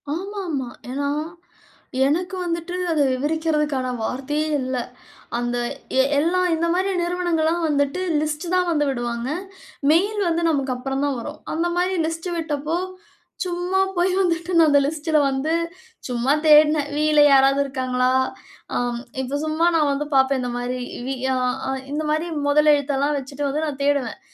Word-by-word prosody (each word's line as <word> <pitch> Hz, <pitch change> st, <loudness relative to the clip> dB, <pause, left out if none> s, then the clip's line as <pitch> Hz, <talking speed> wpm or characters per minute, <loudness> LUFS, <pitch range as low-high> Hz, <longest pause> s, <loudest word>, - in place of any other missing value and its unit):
ஆமாமா. 355 Hz, -8 st, -4 dB, 0.2 s
ஏன்னா, 280 Hz, +2 st, -2 dB, 1.0 s
எனக்கு 360 Hz, +6 st, -1 dB
வந்துட்டு 340 Hz, 0 st, -3 dB, 0.2 s
அத 310 Hz, -2 st, +2 dB
விவரிக்கிறதுக்கான 300 Hz, -1 st, 0 dB, 0.2 s
வார்த்தையே 295 Hz, +6 st, -2 dB
இல்லை. 255 Hz, -1 st, -2 dB, 0.6 s
அந்த 240 Hz, 0 st, -1 dB, 0.4 s
எ -, -, +6 dB, 0.2 s
எல்லா 340 Hz, +5 st, +2 dB, 0.2 s
இந்த 335 Hz, +1 st, 0 dB
மாரி 380 Hz, +2 st, +1 dB
நிறுவனங்கள்லாம் 345 Hz, -1 st, 0 dB
வந்துட்டு 285 Hz, +4 st, 0 dB, 0.2 s
லிஸ்ட் 305 Hz, +2 st, -2 dB
தான் 360 Hz, -1 st, +2 dB
வந்து 295 Hz, -3 st, +1 dB
விடுவாங்க. 240 Hz, -1 st, -3 dB, 0.6 s
மெயில் 405 Hz, +6 st, +2 dB
வந்து 335 Hz, +1 st, 0 dB
நமக்கு 275 Hz, -4 st, 0 dB
அப்புறம் 270 Hz, +2 st, -2 dB
தான் 280 Hz, -3 st, -1 dB
வரும். 295 Hz, +6 st, -7 dB
அந்த 330 Hz, +2 st, 0 dB
மாரி 365 Hz, +1 st, +1 dB
லிஸ்ட் 330 Hz, +2 st, -4 dB
விட்டப்போ, 310 Hz, 0 st, -2 dB, 0.7 s
சும்மா 355 Hz, +1 st, -1 dB, 0.2 s
போய் 355 Hz, +2 st, +3 dB
வந்துட்டு 340 Hz, -1 st, 0 dB
நான் 325 Hz, -1 st, +6 dB
அந்த 285 Hz, -1 st, +5 dB
லிஸ்ட்டுல 305 Hz, +1 st, +1 dB
வந்து 270 Hz, +4 st, -1 dB, 0.5 s
சும்மா 250 Hz, +2 st, +1 dB
தேடுனேன். 300 Hz, -1 st, +6 dB
வீயில 300 Hz, 0 st, +4 dB
யாராவது 275 Hz, +1 st, +5 dB
இருக்காங்களா? 255 Hz, -2 st, 0 dB, 0.7 s
அம் 245 Hz, -1 st, -1 dB, 0.2 s
இப்போ 265 Hz, +2 st, -2 dB
சும்மா 315 Hz, +2 st, +1 dB
நான் 305 Hz, -3 st, +3 dB
வந்து 280 Hz, +1 st, -1 dB
பார்ப்பேன், 265 Hz, 0 st, +3 dB
இந்த 245 Hz, -1 st, -3 dB
மாரி 245 Hz, +1 st, -3 dB, 0.3 s
வி 270 Hz, -, -1 dB, 0.2 s
அ -, -, 0 dB, 0.3 s
அ -, -, -1 dB, 0.2 s
இந்த 305 Hz, +1 st, -1 dB
மாரி 315 Hz, +3 st, 0 dB, 0.2 s
மொதல் 300 Hz, +1 st, +5 dB
எழுத்தெல்லாம் 285 Hz, 0 st, 0 dB
வச்சுட்டு 275 Hz, +2 st, -4 dB
வந்து 300 Hz, +3 st, -1 dB
நா 305 Hz, -, -1 dB
தேடுவேன், 280 Hz, -4 st, 0 dB
300 Hz, 150 wpm, -22 LUFS, 270-330 Hz, 1.0 s, எ